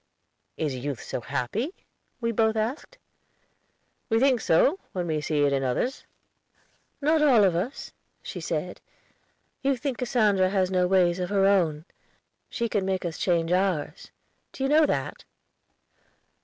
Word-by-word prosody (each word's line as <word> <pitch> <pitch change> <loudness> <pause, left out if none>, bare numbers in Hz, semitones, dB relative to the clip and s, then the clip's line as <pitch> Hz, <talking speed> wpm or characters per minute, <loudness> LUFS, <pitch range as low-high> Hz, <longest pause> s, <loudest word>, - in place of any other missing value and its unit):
"Is 150 -4 -1
youth 130 0 -5
so - - -5
happy?" 145 - -3 0.4
we 230 -1 -1
both 220 0 +2
asked. 245 - -3 1.1
"We 225 -1 +3
think 260 -2 +3
so, 270 - +3
when 180 -2 -2
we 155 -2 -1
see 150 -1 0
it 140 -1 +2
in 135 - +1
others." 135 - -2 0.9
"Not 310 +2 +3
all 255 -8 +5
of 185 -4 +3
us," 195 +11 -4 0.3
she - - -6
said. - - -4 0.8
"You 270 -1 +1
think 255 0 -4
Cassandra 210 -7 +2
has 190 -1 0
no 180 -1 +2
ways 180 -1 +3
of 180 - -2
her 195 -1 +2
own! 170 -6 +2 0.6
She 235 - -2
can 205 -3 -1
make 190 -1 -2
us 165 -2 -4
change 170 -2 +1
ours; 180 -5 -1 0.4
do 265 - -5
you 270 - +1
know 305 +1 +5
that?" - - -3
195 Hz, 150 wpm, -26 LUFS, 165-245 Hz, 1.1 s, all